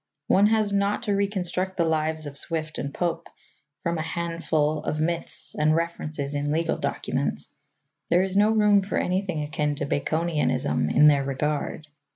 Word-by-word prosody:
One 200 +6 +5
has 215 -2 +2
not 200 +2 +1
to 210 -3 0
reconstruct 190 -2 -1
the 170 - +2
lives 155 -1 0
of 145 -1 -7
Swift 155 +1 -4
and 140 - -3
Pope 170 +1 -2 0.6
from 170 -1 -1
a - - 0
handful 165 -2 -1
of 155 - -3
myths 170 +2 -2
and 155 +1 +2
references 155 -4 -3
in 145 0 -1
legal 165 +1 0
documents. - - -2 0.6
There 175 +2 +4
is 190 0 -3
no 205 +2 +5
room 210 -2 +4
for 195 - -3
anything 180 -4 -1
akin 150 0 -1
to 145 - -2
Baconianism 155 - 0
in 150 - +6
their 140 -2 +5
regard. 150 +3 -2
165 Hz, 165 wpm, -25 LUFS, 150-185 Hz, 0.6 s, in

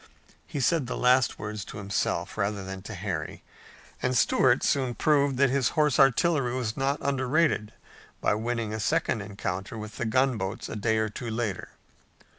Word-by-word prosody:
He 145 - -4
said 145 0 +2
the - - -3
last 125 0 +3
words 105 -1 -5
to - - -9
himself, 100 -1 -2
rather 100 -1 -1
than 95 0 -6
to 105 +2 -8
Harry, 90 -5 -4 0.6
and 125 -1 +1
Stuart 125 +2 +3
soon 130 -4 +1
proved 140 -3 +2
that 135 -1 +4
his 135 -3 +2
horse 150 -3 +3
artillery 135 -1 +3
was 120 -4 -2
not 135 +1 0
underrated 135 -4 +1 0.5
by - - +2
winning 115 0 -2
a 110 - -3
second 110 0 0
encounter 100 0 -5
with 105 -1 -8
the 120 - -2
gunboats 115 -4 0
a - - -5
day 110 +1 +1
or 110 0 0
two 115 +3 -6
later. 110 -4 -3
115 Hz, 170 wpm, -27 LUFS, 105-135 Hz, 0.6 s, that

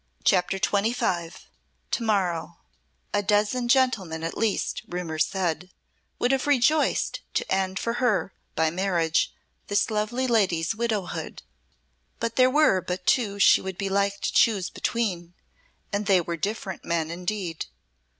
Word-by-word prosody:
CHAPTER 185 0 +2
XXV 200 -4 -1 0.5
To - - 0
morrow 185 -7 0 0.6
A 205 - +2
dozen 210 +5 +1
gentlemen 225 -11 +2
at 165 - -3
least, 225 -3 -1
rumour 170 -3 -4
said, 180 -1 -1 0.5
would 245 - +1
have 270 +1 0
rejoiced 290 +2 +2 0.2
to - - -1
end 190 0 0
for 230 - -1
her, 215 -6 +1 0.2
by 160 0 +2
marriage, 170 -3 +1 0.4
this 205 +2 +1
lovely 215 +4 -1
lady's 195 -8 +2
widowhood; 220 -4 -3 0.8
but 230 0 -2
there 255 0 +5
were 270 -9 +4
but 180 0 -5
two 210 -6 +2
she 200 - +6
would 190 -1 -6
be 195 - -2
like 200 +1 0
to - - -1
choose 200 -5 +3
between, 180 -7 -2 0.6
and 200 0 -1
they 195 -3 +5
were 170 0 -3
different 195 +2 -4
men 165 -1 -1
indeed. 180 -1 -4
195 Hz, 140 wpm, -25 LUFS, 175-225 Hz, 0.8 s, she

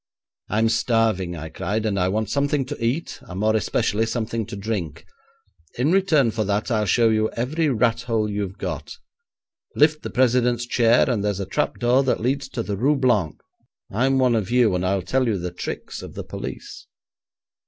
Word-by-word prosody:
'"I'm 110 +1 +2
starving," 110 -6 +1
I 80 0 -7
cried, 100 +7 -2
"and 100 -2 0
I 90 - +2
want 105 +3 -1
something 140 -1 +1
to 125 - -6
eat, 130 +9 -2
and 95 +1 -8
more 110 +1 +2
especially 110 0 0
something 115 -2 -2
to - - -7
drink. 100 -6 -4 0.7
In 135 +6 +2
return 160 - +3
for 110 0 -1
that 105 +4 -1
I'll 105 -2 +1
show 115 +4 +4
you 110 0 +2
every 150 +7 0
rat 120 -2 +1
hole 115 -3 0
you've 100 -2 -4
got. - - -5 0.8
Lift 150 +1 +3
the - - -5
president's 125 -1 +2
chair, 120 0 +3
and 115 -6 0
there's 100 -2 -1
a 100 - -2
trap 95 - -1
door 125 +2 +3
that 130 -2 0
leads 135 +4 -1
to 120 -4 -3
the 100 -2 -3
Rue 140 +8 +2
Blanc. 120 - +1 0.5
I'm 130 +6 +2
one 130 -2 +3
of 110 -3 0
you, 120 -4 +3
and 90 0 -1
I'll 95 0 0
tell 130 +7 +1
you 110 -3 +1
the 90 0 -4
tricks 90 - -6
of - - -10
the - - -5
police." - - -8
115 Hz, 190 wpm, -23 LUFS, 100-125 Hz, 0.8 s, show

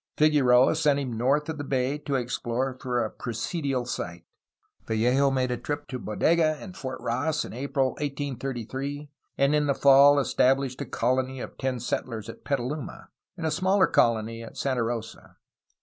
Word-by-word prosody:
Figueroa 135 -4 +5
sent 150 -3 +2
him 135 -4 -3
north 135 +6 +1
of 160 -2 -4
the - - -3
bay 135 +1 -1
to 145 -2 -3
explore 125 +1 -2
for 125 -1 0
a - - -5
presidial 130 +2 -3
site. 85 -7 -5 0.6
Vallejo 125 +5 +2
made 130 -2 0
a 125 - -1
trip 145 +3 -4
to 130 - -4
Bodega 155 +8 +2
and 185 -2 -10
Fort 130 -8 -6
Ross 145 +7 -1
in - - -9
April 135 +1 0
1833, 140 0 -4 0.3
and 140 +1 +3
in 150 -1 +2
the 140 - +2
fall 140 +1 +7
established 135 -1 +1
a - - -2
colony 130 +2 -1
of - - -7
ten 130 -2 -1
settlers 115 -2 -3
at - - -10
Petaluma 140 +2 -4 0.3
and 165 - -4
a 160 - +1
smaller 185 +2 +3
colony 115 0 +1
at 115 - -10
Santa 130 -3 0
Rosa. 115 -1 -5
135 Hz, 165 wpm, -26 LUFS, 125-145 Hz, 0.6 s, fall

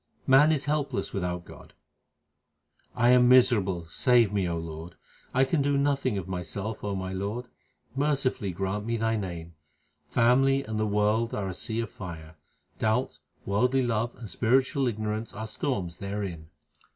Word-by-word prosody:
Man 140 +4 +6
is 150 -3 0
helpless 145 -8 -1
without 90 -2 -3
God: - - -14 1.2
I 120 +1 +3
am 125 0 +6
miserable; 105 -9 +4
save 115 - +3
me, 95 -3 0
O 85 - -2
Lord, 80 +1 -7 0.4
I 130 - +3
can 140 +3 +1
do 140 0 +1
nothing 140 -5 +1
of 95 -2 -4
myself, 95 +4 -5
O 100 -1 -2
my 95 0 -4
Lord; 105 +6 -4 0.5
mercifully 135 -7 0
grant 95 +3 -3
me 115 +1 -1
Thy 115 0 +1
name. 85 -5 -5 0.6
Family 135 +3 +3
and 110 -2 -4
the 110 - +1
world 105 +3 +1
are 100 -2 -2
a - - -4
sea 115 +4 -3
of 115 -5 -6
fire; 85 -4 -9 0.4
Doubt, 110 - 0 0.3
worldly 125 +7 +2
love, 115 0 -1
and 115 - -9
spiritual 130 - +1
ignorance 110 0 -3
are 110 -2 -4
storms 105 - -3
therein. 100 -5 -5
110 Hz, 155 wpm, -27 LUFS, 95-125 Hz, 1.2 s, Man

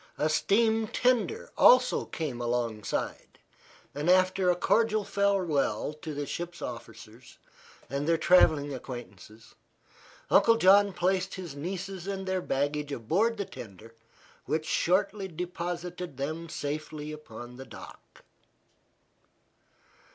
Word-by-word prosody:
A 155 - +1
steam 220 +6 +2
tender 255 - 0
also 250 0 +5
came 140 -7 -4
alongside, 120 -3 -3 0.6
and 150 +4 -2
after 185 0 +4
a 180 - +4
cordial 215 +3 +2
farewell 180 - 0
to 155 -2 -5
the 145 0 -3
ship's 175 +3 -5
officers 115 0 -9 0.5
and 140 +2 -3
their 165 0 +3
travelling 155 -4 +4
acquaintances, 115 -4 -10 0.8
Uncle 230 0 +6
John 200 0 +6
placed 185 +1 0
his 175 -7 -7
nieces 185 +4 -5
and 195 -1 -3
their 185 0 0
baggage 145 0 -1
aboard 185 - 0
the 200 - -2
tender, 115 - -11 0.5
which 155 0 -1
shortly 190 +4 +1
deposited 175 -2 -5
them 160 +4 -4
safely 150 +1 -5
upon 125 -5 -10
the 135 - -9
dock. - - -13
170 Hz, 115 wpm, -29 LUFS, 140-190 Hz, 0.8 s, Uncle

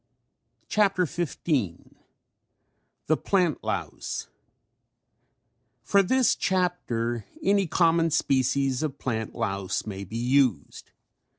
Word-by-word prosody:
] - - -45
CHAPTER 195 -3 +2
XV 170 0 -4 1.7
THE 155 - +2
PLANT 180 -6 +1
LOUSE - - -4 1.5
For 200 - +4
this 255 +6 +3
chapter 120 - -1 0.2
any 200 -1 +3
common 165 0 +3
species 135 -3 +1
of 150 -3 -3
plant 110 -3 -3
louse 100 -4 -2
may 100 -2 -5
be 105 +4 -6
used. 125 - +1
140 Hz, 95 wpm, -26 LUFS, 115-180 Hz, 1.7 s, For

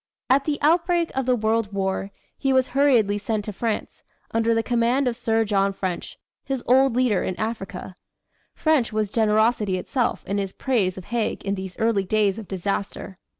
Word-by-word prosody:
At 275 +1 +4
the 300 -2 0
outbreak 340 +2 +2
of 265 -1 -2
the 250 - +4
World 220 -1 0
War, 195 0 -2 0.3
he 270 - 0
was 260 -1 +3
hurriedly 245 -7 +3
sent 210 0 -2
to 210 - -5
France, 225 +2 -3 0.3
under 225 0 +2
the 225 - +1
command 245 +3 +1
of 240 - 0
Sir 225 -2 +1
John 200 -1 +1
French, 185 -3 -4 0.3
his 270 -3 -3
old 260 0 +4
leader 250 -6 +2
in 185 - -3
Africa. 215 -4 -4 0.6
French 310 -7 +2
was 215 -2 -1
generosity 215 -2 +2
itself 245 +6 -1
in 200 +1 -1
his 195 -1 -3
praise 205 -9 0
of 185 - -8
Haig 235 -3 -2
in 195 - 0
these 190 -2 -6
early 225 -3 +1
days 210 +1 +1
of 215 - -9
disaster. 195 0 -3
225 Hz, 180 wpm, -24 LUFS, 200-250 Hz, 0.6 s, At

